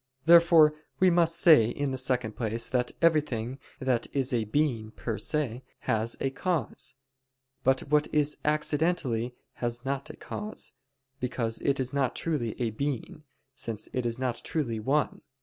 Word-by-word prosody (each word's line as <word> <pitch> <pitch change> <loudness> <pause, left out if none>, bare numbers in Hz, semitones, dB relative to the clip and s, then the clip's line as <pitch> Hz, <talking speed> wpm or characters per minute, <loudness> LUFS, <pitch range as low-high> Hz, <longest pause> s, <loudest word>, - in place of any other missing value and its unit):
Therefore 165 -2 +7 0.3
we 185 -1 +5
must 170 -1 +3
say, 155 -10 +7
in 140 +3 -2
the - - -2
second 125 -3 0
place, 115 -1 -1
that 125 -1 0
everything 135 -6 +1 0.2
that 130 -3 0
is 135 -1 +1
a 115 -2 +1
being 115 -2 0
per 110 -1 -4
se, 130 -2 -1 0.2
has 115 -1 -1
a 135 - -1
cause; 145 -4 -2 0.7
but 130 0 +3
what 150 +1 +2
is 150 0 +2
accidentally, 150 -6 0 0.3
has 120 +1 -2
not 140 0 -2
a - - -8
cause, 215 +1 -4 0.5
because 120 -3 -2
it 140 -1 0
is 130 0 -2
not 135 -3 0
truly 135 -10 -2
a 120 -3 0
being, 140 +5 -4 0.3
since 110 -4 -5
it 125 -2 0
is 115 0 -2
not 125 -2 -2
truly 120 -9 -2
one. 140 +7 0
130 Hz, 155 wpm, -28 LUFS, 115-150 Hz, 0.7 s, Therefore